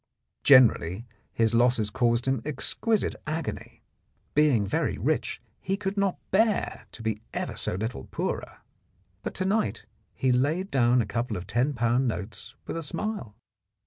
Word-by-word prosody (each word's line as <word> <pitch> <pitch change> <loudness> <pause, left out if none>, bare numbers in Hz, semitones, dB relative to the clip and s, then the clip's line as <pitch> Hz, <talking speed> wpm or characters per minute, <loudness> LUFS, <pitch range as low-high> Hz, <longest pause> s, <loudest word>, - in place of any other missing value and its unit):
Generally 115 -6 +5 0.3
his 115 0 +1
losses 115 -3 +3
caused 120 -1 +2
him 130 -3 +1
exquisite 205 - 0
agony: 160 +2 -4 0.5
being 140 -8 +4
very 100 - 0
rich, - - -1 0.2
he 195 +2 -1
could 195 0 -3
not 200 -2 +1
bear 215 +2 +1
to 115 - -9
be 110 -1 -1
ever - - -2
so - - -2
little 105 - -4
poorer. - - -4 0.6
But - - -5
to 185 - -1
night 210 +3 0 0.3
he 130 - +2
laid 150 +10 +1
down 120 -2 +4
a - - -5
couple 115 +1 -2
of 90 - -6
ten 120 +9 +1
pound 120 +1 +2
notes 100 -1 -5
with - - -4
a - - -2
smile. 165 - -4
125 Hz, 150 wpm, -27 LUFS, 115-165 Hz, 0.6 s, Generally